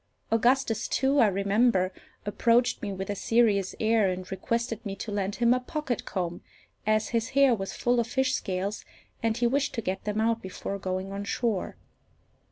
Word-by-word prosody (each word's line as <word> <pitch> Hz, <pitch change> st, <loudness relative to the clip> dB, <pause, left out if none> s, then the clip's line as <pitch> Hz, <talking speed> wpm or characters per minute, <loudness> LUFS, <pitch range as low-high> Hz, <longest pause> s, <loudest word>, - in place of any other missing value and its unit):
Augustus, 230 Hz, -1 st, +2 dB
too, 275 Hz, +2 st, +2 dB
I 230 Hz, -, +6 dB
remember, 200 Hz, 0 st, +2 dB, 0.3 s
approached 235 Hz, +4 st, +2 dB
me 205 Hz, -, -3 dB
with 190 Hz, +1 st, -4 dB
a -, -, -2 dB
serious 205 Hz, -3 st, +2 dB
air, 220 Hz, -2 st, +3 dB
and 185 Hz, 0 st, -5 dB
requested 230 Hz, +3 st, -2 dB
me 200 Hz, -3 st, -4 dB
to 210 Hz, -, -6 dB
lend 200 Hz, -1 st, -1 dB
him 235 Hz, 0 st, +4 dB
a 255 Hz, -, +1 dB
pocket 255 Hz, -1 st, -3 dB
comb, 175 Hz, -3 st, -3 dB, 0.5 s
as 215 Hz, 0 st, +2 dB
his 230 Hz, 0 st, 0 dB
hair 275 Hz, -3 st, +6 dB
was 195 Hz, -3 st, -3 dB
full 245 Hz, 0 st, +1 dB
of 230 Hz, -, 0 dB
fish 265 Hz, +2 st, +1 dB
scales, 195 Hz, 0 st, -2 dB, 0.4 s
and 225 Hz, 0 st, 0 dB
he 240 Hz, -, +1 dB
wished 275 Hz, +4 st, +1 dB
to 230 Hz, -, -1 dB
get 190 Hz, 0 st, -3 dB
them 210 Hz, 0 st, -1 dB
out 230 Hz, +1 st, +1 dB
before 190 Hz, +1 st, -5 dB
going 185 Hz, +1 st, -3 dB
on 200 Hz, +1 st, -4 dB
shore. 220 Hz, -1 st, -1 dB
220 Hz, 180 wpm, -28 LUFS, 195-240 Hz, 0.5 s, I